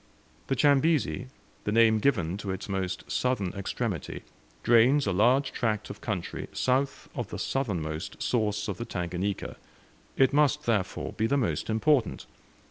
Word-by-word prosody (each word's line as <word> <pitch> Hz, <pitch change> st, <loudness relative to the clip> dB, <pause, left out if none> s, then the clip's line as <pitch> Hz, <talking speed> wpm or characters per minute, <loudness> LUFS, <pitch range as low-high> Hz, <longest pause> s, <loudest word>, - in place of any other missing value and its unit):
The 135 Hz, -, +1 dB
Chambezi, 145 Hz, -1 st, +2 dB, 0.4 s
the 105 Hz, -, -1 dB
name 110 Hz, 0 st, +5 dB
given 95 Hz, -10 st, +1 dB
to 100 Hz, -, -6 dB
its 95 Hz, -1 st, -4 dB
most 95 Hz, -2 st, -2 dB
southern 125 Hz, -8 st, 0 dB
extremity, 100 Hz, -, -4 dB, 0.4 s
drains 120 Hz, +5 st, +5 dB
a 100 Hz, -, +1 dB
large 125 Hz, +9 st, +3 dB
tract 110 Hz, -3 st, -1 dB
of -, -, -10 dB
country 100 Hz, -7 st, -4 dB
south 135 Hz, +2 st, 0 dB
of -, -, -4 dB
the -, -, -6 dB
southernmost 85 Hz, -, -3 dB
source 105 Hz, -3 st, 0 dB
of -, -, -4 dB
the 120 Hz, -, -3 dB
Tanganika; 90 Hz, -1 st, -3 dB, 0.6 s
it 135 Hz, 0 st, +4 dB
must, 150 Hz, 0 st, +3 dB
therefore, 105 Hz, -6 st, -1 dB
be 110 Hz, -, 0 dB
the 140 Hz, -, +2 dB
most 95 Hz, -, -1 dB
important. 115 Hz, +1 st, +1 dB
110 Hz, 145 wpm, -28 LUFS, 95-130 Hz, 0.6 s, name